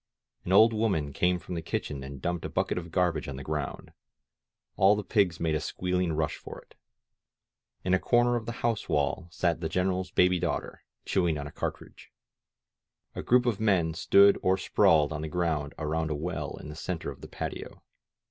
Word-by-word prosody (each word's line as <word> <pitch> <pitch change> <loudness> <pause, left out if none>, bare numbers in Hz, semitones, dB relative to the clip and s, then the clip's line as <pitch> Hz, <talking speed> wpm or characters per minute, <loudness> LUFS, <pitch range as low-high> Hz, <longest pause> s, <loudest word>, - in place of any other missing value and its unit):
An 90 - -3
old 110 +4 +7
woman 95 -11 0
came 90 +5 +2
from 90 +1 -8
the 85 - -3
kitchen 70 -3 -4
and 70 -1 -9
dumped 85 -1 -2
a - - -4
bucket - - -1
of 85 0 -9
garbage 90 -2 0
on 70 - -5
the 70 - -7
ground; 75 -1 -4 0.8
all 95 +2 +5
the 105 - -3
pigs 100 -7 +1
made 80 -2 0
a 75 - +1
squealing 90 -1 -1
rush 75 -1 -1
for - - -10
it. - - -21 1.1
In 90 - +1
a 95 - +4
corner 120 0 +3
of 115 -2 -3
the - - -2
house 115 -3 -1
wall 75 +2 0
sat 85 0 -1
the 80 - -2
GreneraPs 90 +1 -1
baby 90 0 +4
daughter, 85 -1 -3 0.2
chewing 85 -5 +1
on 70 - -5
a 75 - -8
cartridge. - - -6 1.0
A - - -5
group 125 0 +3
of 115 -5 0
men 95 -7 +2
stood 100 +4 +5
or 95 +1 +2
sprawled 80 -5 +3
on 75 - -4
the 80 - -4
ground 80 -4 -1
around 80 +1 -2
a 75 - -1
well 85 +5 -4
in - - -9
the 75 - -8
center 85 +1 -4
of - - -13
the - - -9
patio. - - -7
85 Hz, 195 wpm, -28 LUFS, 80-95 Hz, 1.1 s, old